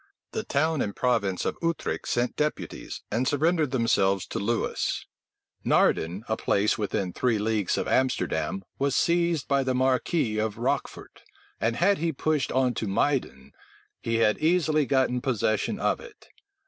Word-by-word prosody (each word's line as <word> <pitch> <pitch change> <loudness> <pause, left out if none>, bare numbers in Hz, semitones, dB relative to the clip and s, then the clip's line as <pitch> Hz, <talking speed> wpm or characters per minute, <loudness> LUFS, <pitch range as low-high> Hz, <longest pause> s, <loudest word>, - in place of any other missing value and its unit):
The - - -3
town 155 +1 0
and 100 - -2
province 100 -7 0
of - - -2
Utrecht 165 -1 -2
sent 120 0 0
deputies, 150 0 -3
and 120 +5 0
surrendered 155 +1 +2
themselves 100 -7 +2
to - - -3
Lewis 115 +3 -1 0.6
Naerden, 85 +6 +2
a 110 - 0
place 105 -1 +1
within 100 -3 -2
three 120 -3 +1
leagues 105 -2 0
of - - -1
Amsterdam, 95 -9 0 0.2
was 140 -1 +1
seized 170 -3 +1
by 140 -1 +2
the 130 -1 0
marquis 130 -2 +1
of 110 -1 -2
Rochfort; - - -3 0.4
and 115 +1 0
had 195 +5 +3
he 165 +1 0
pushed 150 -2 0
on 130 -1 +2
to 110 - -3
Muyden, 100 - -1 0.5
he 115 - -1
had 110 -2 +2
easily 155 -3 +2
gotten 130 -2 +1
possession 110 -5 0
of - - +1
it. - - -14
125 Hz, 150 wpm, -26 LUFS, 105-150 Hz, 0.6 s, had